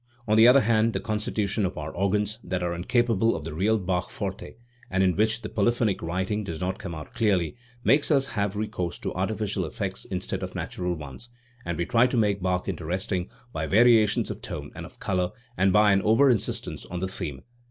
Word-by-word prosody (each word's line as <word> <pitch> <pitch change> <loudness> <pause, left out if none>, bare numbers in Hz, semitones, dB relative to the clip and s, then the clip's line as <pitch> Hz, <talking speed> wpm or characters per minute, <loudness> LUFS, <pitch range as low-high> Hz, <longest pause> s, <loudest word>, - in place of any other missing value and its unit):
On 110 - +3
the 110 +2 +8
other 130 +2 +7
hand 110 +1 +2
the - - -1
constitution 105 -2 -1
of 95 -1 -2
our 75 +1 -4
organs, 105 +3 0
that 90 -1 -2
are 85 0 -1
incapable 115 +4 +2
of 80 - -5
the 80 0 -6
real 105 +7 +2
Bach 90 -3 -1
forte, 95 -1 -5 0.3
and 95 +1 +2
in 90 -2 +3
which 110 +2 +1
the - - -3
polyphonic 115 -1 +1
writing 95 +5 -2
does 85 -5 -5
not 95 +1 -2
come 85 -3 -6
out 80 +8 -9
clearly, 100 -9 +1 0.3
makes 140 +8 +4
us 140 -3 +4
have 100 -3 -1
recourse 105 -5 -3
to - - -4
artificial 100 +1 -1
effects 95 +3 -4
instead 95 -1 -4
of - - -5
natural 90 -1 -3
ones, 75 - -8 0.4
and 85 -2 -2
we 85 - 0
try 120 +7 +4
to 125 - -1
make 100 -3 +2
Bach 90 0 0
interesting 90 +1 -2 0.2
by 80 0 -2
variations 110 0 +4
of - - -7
tone - - -6
and - - -7
of - - -20
colour 90 -2 -1 0.2
and 95 0 +3
by 105 +1 +5
an 100 0 +3
over 120 +7 +5
insistence 110 -5 -2
on 90 - -5
the 95 - -1
theme. 80 -8 -6
100 Hz, 205 wpm, -26 LUFS, 90-110 Hz, 0.4 s, the